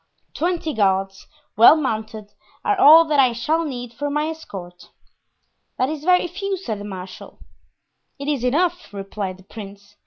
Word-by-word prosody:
Twenty 335 -2 -2
guards, 195 -2 0 0.3
well 230 +7 +8
mounted, 220 -7 -4 0.3
are 415 - +2
all 330 -2 +8
that 300 -2 +1
I 255 -3 +4
shall 310 +8 0
need 245 -6 -6
for 290 +5 -4
my 300 +2 -1
escort." 180 - -10 0.9
"That 255 - +1
is 305 -1 -6
very 360 0 +4
few," 390 +2 -4
said 225 - -5
the 205 - -8
marshal. 185 -2 -9 0.8
"It 280 0 -7
is 285 -5 -1
enough," 345 +7 0
replied 195 -1 -5
the 190 - -18
prince. 200 0 -12
250 Hz, 155 wpm, -21 LUFS, 205-315 Hz, 0.9 s, well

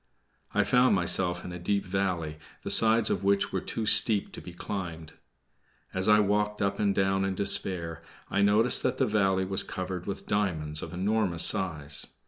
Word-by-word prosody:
I - - +1
found 125 -2 +3
myself 90 -1 +1
in 90 - -7
a 90 - -8
deep 100 +3 -2
valley, 90 -5 -3 0.2
the - - -4
sides 115 0 +4
of 95 - -2
which 100 0 +1
were - - -2
too 110 - -5
steep 105 -1 +4
to - - -9
be 90 - -10
climbed. 85 -3 -7 0.8
As 95 +1 -2
I 105 0 +5
walked 105 0 0
up 100 0 -2
and 100 -2 0
down 95 0 0
in 95 -1 -2
despair 85 -4 +1 0.3
I 100 - -1
noticed 105 +4 +3
that - - -2
the - - +1
valley 95 -3 0
was 95 +1 -2
covered 90 -1 -6
with 100 - -6
diamonds 80 -7 -2
of 80 - -8
enormous 95 -1 0
size. 75 -6 +1
95 Hz, 180 wpm, -27 LUFS, 90-105 Hz, 0.8 s, I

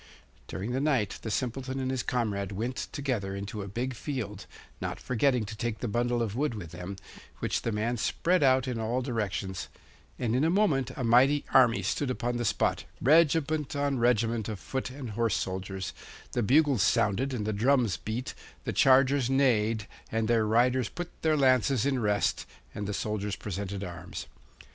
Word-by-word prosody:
During 100 +6 -4
the 130 +2 0
night 135 -9 +1
the 110 - -4
Simpleton 130 +3 -2
and 130 0 -1
his 130 -2 -1
comrade 105 -6 -1
went, 120 +5 -3
together 120 -10 -2
into 100 +2 -5
a 100 - -6
big 120 +6 -3
field, 110 -6 -5 0.3
not - - -3
forgetting 125 -1 +1
to 110 +2 -7
take 115 0 -2
the 120 - -3
bundle 120 +2 0
of 110 -2 -3
wood 140 -2 0
with 85 -6 -7
them, 90 +3 -6 0.4
which - - -1
the 115 - -2
man 110 +3 -1
spread 180 +10 +1
out 130 -2 +4
in 125 -3 -2
all 120 +3 -1
directions 100 -7 -3 0.5
and 120 -1 0
in 130 - +2
a 160 - +3
moment 165 - +2
a 130 - -3
mighty 130 +5 +4
army 125 -3 +5
stood 145 - -1
upon 120 -1 -1
the 120 - -2
spot, - - 0
regiment 155 0 +3
on 140 -2 0
regiment 115 -2 +2
of 105 -3 -5
foot 130 - -4
and 130 -3 -7
horse 115 0 +1
soldiers; 95 0 -3 0.4
the 120 - 0
bugles 135 +1 +4
sounded 105 +8 +2
and 115 -5 -3
the 110 - -1
drums 120 -1 +2
beat, 115 +4 -4 0.3
the - - -3
chargers 135 -1 +4
neighed, 115 -6 +2 0.3
and 110 0 0
their 115 -2 +3
riders 125 +2 +3
put 175 0 -6
their 155 -1 +2
lances 130 -2 +3
in 135 -2 +1
rest, 105 -2 0 0.3
and 105 - -4
the 105 - -2
soldiers 105 -2 -2
presented 100 0 -5
arms. 90 -1 -7
120 Hz, 180 wpm, -29 LUFS, 105-130 Hz, 0.5 s, army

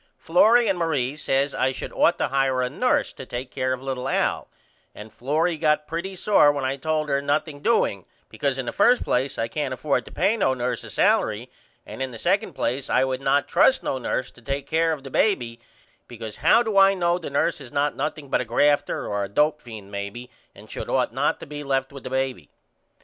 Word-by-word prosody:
Florrie 220 +8 +4
and 190 -3 0
Marie 145 -5 0
says 140 -1 0
I 130 - +1
should - - -7
ought - - +3
to - - -1
hire 135 -1 +1
a 125 - -2
nurse 250 - +1
to - - -9
take 125 0 -6
care 130 0 -1
of 130 0 -3
little 130 -2 -3
Al - - 0 0.5
and 105 +1 -11
Florrie 155 +6 0
got 150 -1 +1
pretty 170 +5 -5
sore 185 -6 +4
when 140 -2 -3
I 130 +1 -1
told 155 +2 -1
her 140 0 +1
nothing 145 +1 -2
doing 235 - +1 0.2
because - - -2
in - - -3
the - - -3
first 245 +1 +3
place 130 +2 -1
I 115 - -1
can't 135 0 -3
afford 140 +3 -1
to - - -12
pay 200 +5 +1
no 130 -10 +1
nurse 125 0 -3
a - - -9
salery - - +1 0.4
and - - -9
in 130 - -1
the 120 - -9
second 195 - 0
place 125 +3 -2
I - - +3
would 130 0 -2
not 140 +1 +2
trust 265 - +3
no 130 - -2
nurse 130 +1 -2
to 125 - -19
take 140 +3 -3
care 165 +2 +1
of 150 -4 -4
the 135 - -9
baby 120 - 0 0.5
because 110 -3 -8
how 235 - +4
do 215 -4 +2
I 195 0 +6
know 175 -1 +1
the 170 - -6
nurse 140 +1 0
is 130 - -11
not 145 0 0
nothing 150 0 -4
but 130 - +1
a - - -4
grafter 145 +4 +1
or 100 0 -2
a 100 - -5
dope 150 +7 +1
fiend 110 -4 -10
maybe 100 +5 -6 0.2
and - - -14
should - - -6
ought - - 0
not - - 0
to - - -7
be 145 0 -7
left 135 -1 -1
with 140 - -10
the - - -4
baby? 130 - -2
140 Hz, 225 wpm, -24 LUFS, 130-160 Hz, 0.5 s, I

